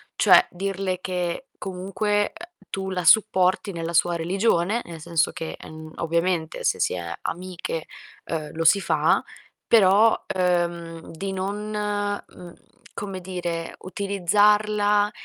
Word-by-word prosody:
Cioè, - - +6
dirle 190 0 -2
che 180 +7 -3
comunque, 200 +2 -1
uhm, 345 +1 -14
tu 190 0 -3
la 180 -2 -3
supporti 190 0 +4
nella 170 -1 -4
sua 170 +1 +3
religione, 190 +4 +1
nel 165 -2 -9
senso 165 -1 +1
che, 160 - -6
en 155 0 -10
ovviamente 170 0 -1
se - - +1
si - - +1
è 85 -1 -5
amiche, 175 -2 -4 0.5
uhm, 155 -2 -3
lo 165 0 -2
si 200 +5 +6
fa, - - +2 0.4
però, 215 +1 +5 0.2
uhm, 170 -2 -1
di 195 +4 -5
non, 200 +3 -3
mhmm, 205 -4 -4 0.4
come 195 -2 -5
dire, 175 -2 -4
utilizzarla 205 +2 +2
185 Hz, 125 wpm, -24 LUFS, 170-205 Hz, 0.5 s, Cioè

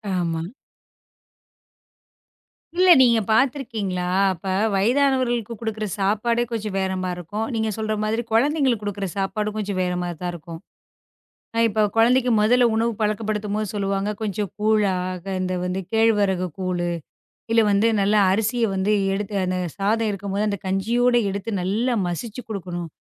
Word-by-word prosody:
ஆமா. 165 -2 -1 2.3
இல்ல, 365 +1 +4
நீங்கப் 235 -5 +4
பார்த்துருக்கீங்களா? 220 -7 0 0.2
அப்ப 185 0 -8 0.3
வயதானவர்களுக்குக் 240 0 +1
குடுக்கிற 220 -2 -3
சாப்பாடே 220 +4 +1
கொஞ்சம் 215 -3 -3
வேறமாரி 185 -1 -1
இருக்கும். 205 +6 -4
நீங்கச் 220 -2 -1
சொல்ற 215 0 -1
மாதிரி, 220 +2 0
குழந்தைகளுக்குக் 260 -1 +2
குடுக்கிற 200 -1 -3
சாப்பாடும் 210 +2 -2
கொஞ்சம் 205 -2 -3
வேறமாதிரி 180 -1 -2
தான் 180 -1 -2
இருக்கும். 165 -1 -9 1.0
அ - - -2
இப்ப 215 0 0
குழந்தைக்கு 245 +2 +4
முதல்ல 245 +3 +4
உணவு 230 +1 +1
பழக்கப்படுத்தும் 210 -1 -1
போது 215 0 -1
சொல்லுவாங்க, 200 0 -1
கொஞ்சம் 205 -1 -2
கூழா 210 -2 +2 0.5
இந்த 185 0 -1
வந்து 180 +1 -2
கேழ்வரகு 205 -5 +2
கூழு, 180 -2 -1 0.6
இல்ல 230 0 +5
வந்து 205 +3 +3
நல்ல 200 +2 +2 0.2
அரிசிய 225 +4 +1
வந்து 190 +2 +1 0.2
எடுத்து, 205 +1 -4
அந்தச் 180 -2 -3
சாதம் 220 +3 +1
இருக்கும்போது 200 +1 -2
அந்தக் 200 -2 -4
கஞ்சியோடு 240 +6 +2
எடுத்து, 200 +3 -4
நல்லா 220 +7 0
மசிச்சு 215 +8 -5
குடுக்கணும். 175 -5 -5
210 Hz, 130 wpm, -23 LUFS, 190-225 Hz, 2.3 s, இல்ல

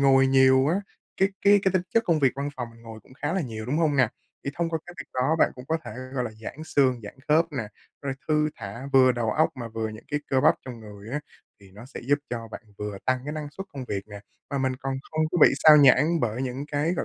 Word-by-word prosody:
ngồi 135 -1 +5
nhiều 130 0 +5
á, 170 - +2 0.4
cái 195 - +3
cái 205 0 +6
cái 190 - +2
tính 185 - +2
chất 230 0 +4
công 165 -3 +3
việc 135 -3 +3
văn 140 +1 -2
phòng 125 -2 -4
mình 115 0 -18
ngồi 110 -1 -10
cũng 130 - -19
khá 145 - 0
là 190 - 0
nhiều, 110 -7 -5
đúng 145 +5 0
hông 155 -4 +2
nè? 125 -4 +4 0.4
Thì 140 - -2
thông 170 +1 -1
qua 160 - -1
cái 175 - -10
việc - - -9
đó, 130 +6 +2
bạn - - +4
cũng 125 - -10
có 160 - +1
thể, - - -7 0.2
gọi 125 -2 0
là, 115 - -4
giãn 155 +7 -7
xương, 130 -5 +2
giãn 105 - -9
khớp 160 +3 +4
nè, 120 -7 -3 0.3
rồi 140 -1 -2
thư 150 0 +2
thả 115 +7 -7
vừa 130 -1 +6
đầu 115 -2 -1
óc 155 +8 +3
mà 120 -2 -5
vừa 110 0 -3
những 110 +1 -10
cái 150 0 0
cơ 130 - +3
bắp 150 - +5
trong 125 -3 -8
người 105 0 -11
á, 150 +2 -2 0.4
thì 95 -1 -17
nó 110 +5 -12
sẽ 135 - -9
giúp 145 - +4
cho 115 -2 -4
bạn 110 - -9 0.2
vừa 105 -1 -5
tăng 130 -1 +2
cái 150 - -4
năng 150 -1 -5
suất 195 +7 -8
công 135 -2 -6
việc 100 -1 -2
nè, 100 -1 -9 0.3
mà 140 - -1
mình 130 -1 0
còn 135 +1 -3 0.2
không 155 0 0
có 180 - 0
bị - - +9 0.2
xao 155 -1 +10
nhãng 150 +4 +5
bởi 115 +4 -1
những 130 +2 -3
cái, 150 +4 +1
gọi - - -2
135 Hz, 280 wpm, -26 LUFS, 115-150 Hz, 0.4 s, xao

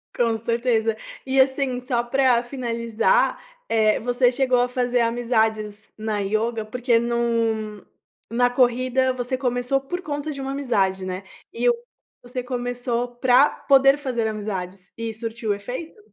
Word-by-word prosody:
Com 230 -2 +2
certeza. 230 -1 0 0.3
E, 265 0 +1
assim, 265 -1 +2
só 240 -2 0
pra 250 -1 +3
finalizar, 240 - 0 0.3
eh, 215 -1 +3
você 245 +1 +2
chegou 255 -1 +2
a 245 - +3
fazer 245 -1 +1
amizades 220 -3 0
na 215 -1 -2
yoga? 220 +3 -1
Porque 240 +2 +1
num 230 -3 -1 0.5
na 245 +2 +2
corrida 255 +1 +2
você 255 +1 -2
começou 250 +1 0
por 355 +7 -5
conta 295 -2 -4
de 275 - -7
uma 270 0 -3
amizade, 195 -9 0
né? 185 +1 -4 0.3
E - - +2
o 485 - +5 0.5
você 250 +1 -5
começou 245 -1 -3
pra 255 +3 +5
poder 275 0 +4
fazer 250 -6 -2
amizades. 195 -4 -5
E 230 -1 -4
surtiu 225 0 -3
o - - +3
efeito? 250 - -7
240 Hz, 145 wpm, -23 LUFS, 220-255 Hz, 0.5 s, o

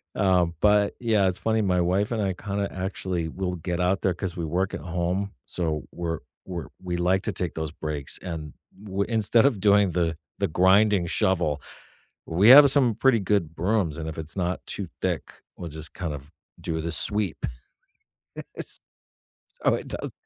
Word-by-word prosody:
um, 90 -3 +2
but, 105 -1 +4
yeah, 110 -5 +2
it's 95 -1 -1
funny 110 0 +1
my 90 -3 +2
wife 95 +5 +1
and 115 -2 -1
I 95 -2 0
kinda 100 +2 -3
actually 95 -2 -3
will 90 +2 -3
get 85 +1 -4
out 90 +2 +1
there 95 - +1
'cause 90 0 -4
we 85 - -2
work 90 +4 -1
at - - -5
home, 90 +3 -2
so 80 -4 -2
we're 85 -2 -3 0.3
we're 90 -3 -5
we 90 -1 -3
like 90 +2 +1
to 110 - -1
take 90 -3 -3
those 80 -1 -3
breaks, 75 -3 -4
and 80 -4 -6 0.4
we 100 +1 0
instead 115 +1 +4
of 130 -8 +2
doing 100 -2 +4
the 85 -1 0 0.2
the - - +1
grinding 95 +2 +4
shovel, 85 -5 +1 0.6
we 95 +7 +4
have 140 +2 +10
some 130 -5 +4
pretty 130 -1 +3
good 90 -5 0
brooms, 90 -3 0
and 80 -1 -4
if 80 - -8
it's 80 0 -4
not 90 -1 -2
too 100 - -2
thick, - - -3 0.2
we'll 85 - -6
just 80 0 -6
kind 85 -4 -4
of 70 0 -9 0.3
do 80 -1 -2
the 85 +1 -3
sweep. 100 +3 +1 1.1
Yes - - -8 0.8
so - - +4
it - - -5
does. - - -4
90 Hz, 180 wpm, -25 LUFS, 85-100 Hz, 1.1 s, have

